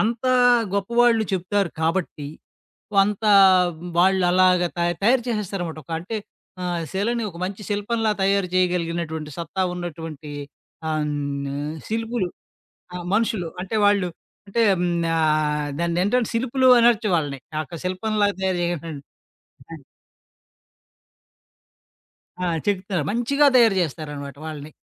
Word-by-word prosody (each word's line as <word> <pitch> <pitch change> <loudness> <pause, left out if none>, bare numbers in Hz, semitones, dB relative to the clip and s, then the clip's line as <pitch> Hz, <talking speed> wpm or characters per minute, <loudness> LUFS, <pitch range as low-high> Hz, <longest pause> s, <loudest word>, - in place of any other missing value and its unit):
అంతా 235 +4 0 0.4
గొప్పవాళ్ళు 235 +3 +3
చెప్తారు 190 0 0
కాబట్టి, 160 -3 -1 0.7
కొంత 200 +2 +3 0.8
వాళ్ళలాగా 180 -1 +4
త - - -7 0.2
తయారు 240 +4 +4
చేసేస్తారనమాట. 195 -7 -3
ఒక 165 - -8
అంటే 195 +6 -5 0.5
ఆహ్, 175 -2 -2
శిలని 230 +5 -1
ఒక 170 - -13
మంచి 195 +3 -4
శిల్పంలా 215 +2 0
తయారు 195 -1 +2
చేయగలిగినటువంటి 170 -4 -1
సత్తా 170 +3 -3
ఉన్నటువంటి 160 -4 -7 0.6
ఆహ్, 155 -1 0
హ్మ్, 140 -1 -3
ఆహ్, 150 +2 -4
శిల్పులు 225 -3 -2 0.7
ఆ! - - -4 0.2
మనుషులు. 215 -5 0
అంటే 195 +4 -3
వాళ్ళు 200 -3 +3 0.4
అంటే 230 +4 -1 0.2
హ్మ్, 180 - +1 0.3
ఆహ్, 150 -1 +1
దాన్నేంటంటే 185 +8 +1
శిల్పులు 260 +2 +2
అనొచ్చు 235 -2 +4
వాళ్ళని. 145 -4 -3 0.2
ఆ - - 0
ఒక్క 165 +4 -9
శిల్పంలాగా 205 +2 0
తయారు 185 -2 0
చేయట 170 -2 -2 0.6
హ్మ్. 155 -5 -14 2.6
ఆ! - - 0 0.2
చెక్కుతారు. 190 -4 -1
మంచిగా 280 +6 +2
తయారు 225 -5 +5
చేస్తారనమాట 145 -3 -6
వాళ్ళని. 155 -1 -7
185 Hz, 115 wpm, -23 LUFS, 160-215 Hz, 2.6 s, తయారు